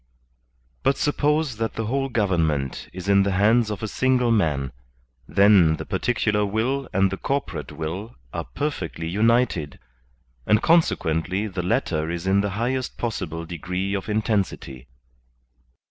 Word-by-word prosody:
But 135 - +2
suppose 150 -3 +1
that 115 0 -2
the 115 - -2
whole 135 +4 -1
government 80 - 0
is 90 +1 -8
in 100 0 +5
the 100 0 +1
hands 110 +4 +3
of 105 0 -5
a - - -1
single 125 +1 +2
man, 75 - +1 0.6
then 100 -5 +5
the - - -7
particular 105 -3 0
will 115 +7 -1
and 95 0 +2
the 95 - -3
corpo 140 +1 -2
rate - - -7
will 90 +9 -5 0.2
are - - -3
perfectly 90 - -4
united, 105 - +1 0.7
and 105 - +5
consequently 95 - +2
the 95 -3 -3
latter 80 -3 0
is 85 +1 -4
in 95 +1 +3
the 100 - -1
highest 130 +3 -2
possible 85 -8 -3
degree 90 +4 -3
of 100 +1 -3
intensity. 100 - -2
100 Hz, 145 wpm, -24 LUFS, 85-115 Hz, 0.7 s, in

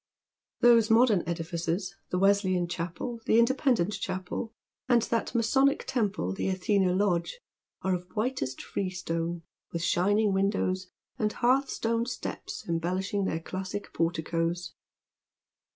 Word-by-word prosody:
Those 235 -2 +6
modern 225 -4 +5
edifices, 170 +2 -2
the 180 - -1
Wesleyan 190 -2 +3
Chapel, 175 +8 -4
the 220 - +5
Independent 235 - +3
Chapel, 185 +5 -4 0.4
and 240 -3 +5
that 230 +1 -1
masonic 270 +5 +3
temple 210 - -1
the - - -2
Athena 190 0 +2
Lodge, 185 - 0 0.4
are 190 - +1
of 180 0 -3
whitest 215 - -2
freestone, 170 -3 -3 0.3
with 170 0 -3
Binning 205 +3 +2
windows, 190 -1 0 0.3
and 210 -1 +1
hearthstoned 240 -2 +1
steps 250 - -6
embellishing 185 +4 -1
their 160 - -1
classic 190 +4 -5
porticoes. 165 +1 -1
190 Hz, 115 wpm, -28 LUFS, 175-225 Hz, 0.4 s, Those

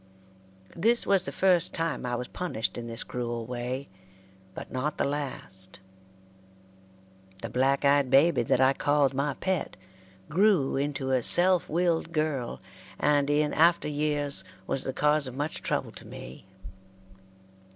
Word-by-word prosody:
This 230 +7 +3
was 195 -2 +2
the - - -4
first 180 -2 +1
time 165 -6 -3
I 120 - -2
was 125 +1 -5
punished 170 -12 -4
in 120 -1 -6
this 115 0 -4
cruel 120 -2 -5
way, 125 +3 -5 0.7
but - - -9
not 135 +4 -3
the - - 0
last. 130 -11 -5 1.6
The - - -5
black 135 +3 +1
eyed 140 -1 +3
baby 140 +6 +4
that 120 +2 0
I 135 +1 +4
called 145 -1 +1
my 140 +1 -2
pet 190 -2 -3 0.5
grew 185 -5 +2
into 135 -1 -3
a 130 -1 +1
self 180 +7 +8
willed 170 0 -1
girl, 155 -6 -3 0.4
and 145 -1 +1
in 150 0 +1
after 170 +1 +3
years 145 -6 -1 0.2
was 135 - 0
the 130 - -2
cause 150 0 +1
of 130 0 -9
much 145 +2 -4
trouble - - -3
to - - -12
me. 65 +9 -11
145 Hz, 145 wpm, -27 LUFS, 130-160 Hz, 1.6 s, self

